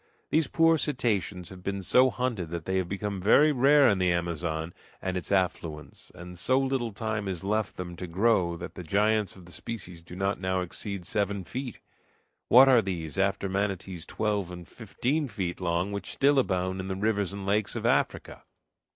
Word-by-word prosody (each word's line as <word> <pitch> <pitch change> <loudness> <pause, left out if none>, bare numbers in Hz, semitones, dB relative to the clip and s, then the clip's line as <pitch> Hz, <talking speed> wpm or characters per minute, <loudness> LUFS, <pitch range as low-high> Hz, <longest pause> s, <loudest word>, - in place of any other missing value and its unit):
These 155 -2 +3
poor 165 +1 +4
cetaceans 105 - -1
have 95 -1 -11
been 100 +1 -3
so 130 +7 +5
hunted 120 -10 -2
that 85 -1 -5
they 95 0 0
have 90 -2 -1
become 100 -1 -3
very 145 +10 +5
rare 140 +1 +5
in 100 -4 +3
the 90 -1 +3
Amazon 85 -1 -2 0.3
and 95 0 -3
its 90 0 -3
affluents, 85 -5 -2
and 90 0 -9
so 130 +8 +3
little 135 -3 0
time 105 0 -3
is 90 -3 -4
left 105 +1 -1
them 90 -1 -6
to 90 - -5
grow 90 -2 +2
that 85 - -7
the - - -8
giants 105 +3 +1
of 95 -2 -14
the 85 - -14
species 90 -1 -7
do 85 +1 -11
not 95 +1 -1
now 95 0 0
exceed 95 +1 -4
seven 100 -1 -1
feet. 125 +6 -6 0.7
What 130 +3 +8
are 125 -3 +6
these, 85 -4 -4
after 100 0 +1
manatees 95 -3 -3
twelve 105 -4 -1
and 90 -1 -9
fifteen 125 +7 -2
feet 95 -7 -4
long, 90 +2 0
which 100 -1 -4
still 140 0 +3
abound 95 -5 0
in 95 - -4
the 95 - -2
rivers 100 -1 0
and 100 -1 -6
lakes 100 +1 +1
of - - -4
Africa? - - 0
95 Hz, 190 wpm, -28 LUFS, 90-110 Hz, 0.7 s, What